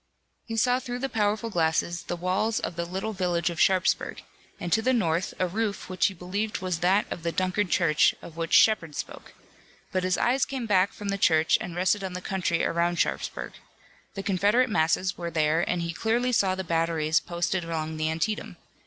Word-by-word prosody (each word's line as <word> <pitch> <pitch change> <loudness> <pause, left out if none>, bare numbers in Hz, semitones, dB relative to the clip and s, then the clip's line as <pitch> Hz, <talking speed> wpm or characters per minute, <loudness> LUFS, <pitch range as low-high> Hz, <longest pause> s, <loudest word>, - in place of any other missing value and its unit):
He 225 -1 -4
saw 250 +3 +3
through 245 -1 -5
the 270 +2 -3
powerful 215 +1 0
glasses 170 0 0
the - - -4
walls 185 +6 0
of - - -4
the 170 0 -2
little 190 +5 -4
village 175 -3 0
of 165 - -3
Sharpsburg, 190 0 +1 0.4
and 175 - -2
to 220 - +3
the 260 +3 +2
north 170 -5 0
a 185 - +1
roof 200 0 -3
which 185 -1 +2
he 195 - -5
believed 200 +5 -3
was 185 -3 -3
that 190 +4 +3
of - - -4
the 170 0 -1
Dunkard 185 +2 0
Church, 155 -4 +3
of 160 - -12
which 165 0 -4
Shepard 165 -9 +4
spoke. - - -7 0.6
But 185 -1 0
his 185 0 +1
eyes 255 +2 +2
came 265 -3 -3
back 200 -1 +3
from 205 -2 -7
the 200 0 -1
church 160 -3 +4
and 175 -1 -6
rested 185 +3 +1
on 190 -1 -4
the 180 - -4
country 180 -3 -1
around 170 +1 0
Sharpsburg. - - -2 0.6
The 195 - -4
Confederate 205 +6 +2
masses 185 0 +1
were 170 -1 -3
there 155 0 +2
and 175 -1 0
he 170 0 -3
clearly 235 +6 0
saw 195 -6 +2
the 190 - -4
batteries 165 -2 +1
posted 175 +1 -2
along 160 -1 -4
the 155 0 0
Antietam. 185 +7 -2
185 Hz, 200 wpm, -26 LUFS, 170-210 Hz, 0.6 s, Shepard